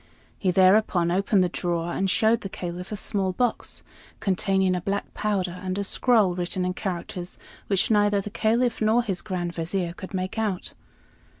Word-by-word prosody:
He 190 Hz, -, +1 dB
thereupon 185 Hz, -1 st, +4 dB
opened 195 Hz, +1 st, +3 dB
the -, -, +2 dB
drawer 175 Hz, -1 st, -2 dB
and 195 Hz, -, 0 dB
showed 220 Hz, +4 st, +3 dB
the 195 Hz, -, -5 dB
Caliph 180 Hz, +1 st, -6 dB
a -, -, -2 dB
small 195 Hz, -2 st, -1 dB
box, 245 Hz, +4 st, -1 dB, 0.4 s
containing 190 Hz, -1 st, +1 dB
a 180 Hz, -, -2 dB
black 200 Hz, +3 st, -3 dB
powder 185 Hz, -4 st, -1 dB
and 185 Hz, 0 st, -3 dB
a 200 Hz, -, 0 dB
scroll 210 Hz, -2 st, +3 dB
written 180 Hz, +1 st, -2 dB
in 180 Hz, -, -1 dB
characters 180 Hz, -1 st, -5 dB, 0.3 s
which 195 Hz, +2 st, +1 dB
neither 205 Hz, -1 st, +4 dB
the 200 Hz, +1 st, -5 dB
Caliph 230 Hz, +2 st, +1 dB
nor 220 Hz, +3 st, +3 dB
his 195 Hz, -5 st, -2 dB
Grand 180 Hz, -4 st, -3 dB
Vizier 170 Hz, +1 st, -2 dB
could 190 Hz, +1 st, -8 dB
make 185 Hz, +4 st, -2 dB
out. 205 Hz, -5 st, -2 dB
190 Hz, 175 wpm, -25 LUFS, 180-210 Hz, 0.4 s, thereupon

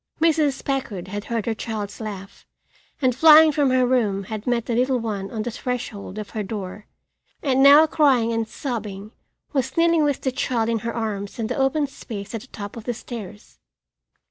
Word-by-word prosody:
Mrs. 310 Hz, -4 st, +2 dB
Packard 220 Hz, -10 st, -3 dB
had 205 Hz, +1 st, -5 dB
heard 230 Hz, -3 st, -2 dB
her 230 Hz, -, 0 dB
child's 215 Hz, -2 st, -5 dB
laugh, 200 Hz, -3 st, -8 dB, 0.6 s
and 255 Hz, -1 st, +4 dB
flying 315 Hz, +2 st, +8 dB
from 285 Hz, -2 st, +2 dB
her 255 Hz, 0 st, +3 dB
room 220 Hz, -6 st, +1 dB
had 215 Hz, +3 st, -7 dB
met 240 Hz, -2 st, +1 dB
the 240 Hz, -, -2 dB
little 255 Hz, +2 st, +2 dB
one 210 Hz, -4 st, -4 dB
on 220 Hz, -2 st, -4 dB
the 240 Hz, -, -3 dB
threshold 225 Hz, -5 st, -5 dB
of 210 Hz, -1 st, -6 dB
her 215 Hz, -, -3 dB
door 205 Hz, 0 st, -6 dB, 0.6 s
and 270 Hz, -2 st, +2 dB
now, 285 Hz, +3 st, +8 dB
crying 265 Hz, -8 st, +3 dB
and 225 Hz, -1 st, -1 dB
sobbing, 215 Hz, -6 st, -5 dB, 0.4 s
was 265 Hz, 0 st, -1 dB
kneeling 335 Hz, -1 st, +4 dB
with 285 Hz, -2 st, 0 dB
the 260 Hz, -, 0 dB
child 240 Hz, -3 st, -1 dB
in 230 Hz, -1 st, 0 dB
her 230 Hz, +2 st, -4 dB
arms 210 Hz, -2 st, -4 dB
in 225 Hz, -, -2 dB
the 250 Hz, -, -2 dB
open 275 Hz, +2 st, +1 dB
space 215 Hz, -7 st, -8 dB
at 225 Hz, -, -4 dB
the 260 Hz, -, -14 dB
top 205 Hz, -4 st, -8 dB
of 230 Hz, -2 st, -9 dB
the 245 Hz, -, -2 dB
stairs. 210 Hz, -4 st, -9 dB
230 Hz, 195 wpm, -23 LUFS, 210-270 Hz, 0.6 s, flying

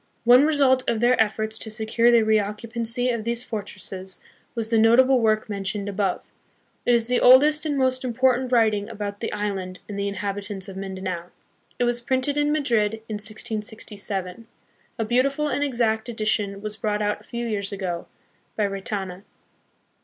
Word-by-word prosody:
One 245 Hz, +4 st, +7 dB
result 270 Hz, -4 st, +3 dB
of 225 Hz, -, 0 dB
their 240 Hz, +2 st, +4 dB
efforts 220 Hz, +1 st, -2 dB
to 220 Hz, -, -2 dB
secure 220 Hz, +2 st, +1 dB
the 235 Hz, -2 st, +5 dB
reoccupancy 225 Hz, +3 st, 0 dB
of 230 Hz, -2 st, -3 dB
these 235 Hz, +1 st, -2 dB
fortresses 190 Hz, -4 st, -5 dB, 0.4 s
was 230 Hz, -1 st, -2 dB
the 225 Hz, -, +4 dB
notable 255 Hz, +4 st, +5 dB
work 215 Hz, -1 st, +1 dB
mentioned 200 Hz, 0 st, -3 dB
above. 200 Hz, -2 st, -1 dB, 0.6 s
It 245 Hz, -, +5 dB
is 230 Hz, -1 st, +1 dB
the 250 Hz, 0 st, +2 dB
oldest 295 Hz, +5 st, +6 dB
and 290 Hz, -2 st, -1 dB
most 260 Hz, -1 st, +1 dB
important 255 Hz, +1 st, +1 dB
writing 220 Hz, -3 st, +2 dB
about 205 Hz, -2 st, -5 dB
the 230 Hz, -, -3 dB
island 195 Hz, -3 st, -3 dB
and 200 Hz, -1 st, -5 dB
the 200 Hz, -, -1 dB
inhabitants 200 Hz, 0 st, -4 dB
of 195 Hz, -, -9 dB
Mindanao. 190 Hz, -2 st, -5 dB, 0.5 s
It -, -, +1 dB
was 240 Hz, 0 st, 0 dB
printed 260 Hz, +3 st, 0 dB
in 295 Hz, 0 st, +1 dB
Madrid 235 Hz, -8 st, +1 dB
in 215 Hz, -, -3 dB
1667. 215 Hz, -2 st, -3 dB, 0.5 s
A 225 Hz, -, -1 dB
beautiful 275 Hz, +6 st, +1 dB
and 285 Hz, -, 0 dB
exact 235 Hz, -4 st, 0 dB
edition 215 Hz, -3 st, -1 dB
was 215 Hz, 0 st, -5 dB
brought 210 Hz, -1 st, -1 dB
out 210 Hz, 0 st, -1 dB
a -, -, -19 dB
few 235 Hz, 0 st, -5 dB
years 205 Hz, -3 st, -2 dB
ago, 185 Hz, -4 st, -4 dB, 0.5 s
by 210 Hz, -, +1 dB
Retana. 195 Hz, -2 st, -4 dB
220 Hz, 165 wpm, -24 LUFS, 205-245 Hz, 0.6 s, One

